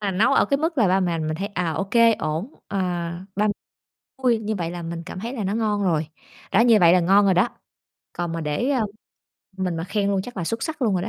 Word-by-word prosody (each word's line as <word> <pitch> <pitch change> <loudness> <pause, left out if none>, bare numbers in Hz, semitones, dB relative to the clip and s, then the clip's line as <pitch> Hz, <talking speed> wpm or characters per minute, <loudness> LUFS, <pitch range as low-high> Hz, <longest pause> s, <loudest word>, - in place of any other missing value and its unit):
Mà 200 -2 -1
nấu 210 +8 +3
ở - - +4
cái 280 - +2
mức 320 -1 -1
là 210 -5 +4
ba 190 +1 +3
mẹ 175 -3 0
mình 155 0 -2
thấy, 195 +3 -3
à, 180 -5 -2
ô 175 +6 -2
kê 230 0 +6
ổn, 160 - -4
ờ, 200 - -2 0.6
ba 210 +1 +2
m - - +3 0.7
vui 240 -3 +3
như 220 0 -3
vậy 170 -3 -3
là 175 -1 -6
mình 165 0 -5
cảm 185 - -7
thấy 235 +4 -5
là 220 - -3
nó 195 +2 -1
ngon 210 -2 0
rồi. 160 -4 +1 0.5
Đó, 195 - +5
như 230 -2 +6
vậy 170 0 +7
là 180 - +5
ngon 195 +4 +4
rồi 190 -2 +4
đó. 185 +7 +3 0.6
Còn 175 -1 -3
mà 165 - -3
để, 155 - -1
ờ, 240 -6 +1 0.7
mình 180 -3 -2
mà 165 - -3
khen 200 +1 -1
luôn 195 -1 0
chắc 245 +1 -10
là 180 - -2
xuất 225 +6 -3
sắc 310 -4 -4
luôn 220 -4 +2
rồi 180 - 0
đó. 215 - -3
195 Hz, 270 wpm, -23 LUFS, 175-225 Hz, 0.7 s, vậy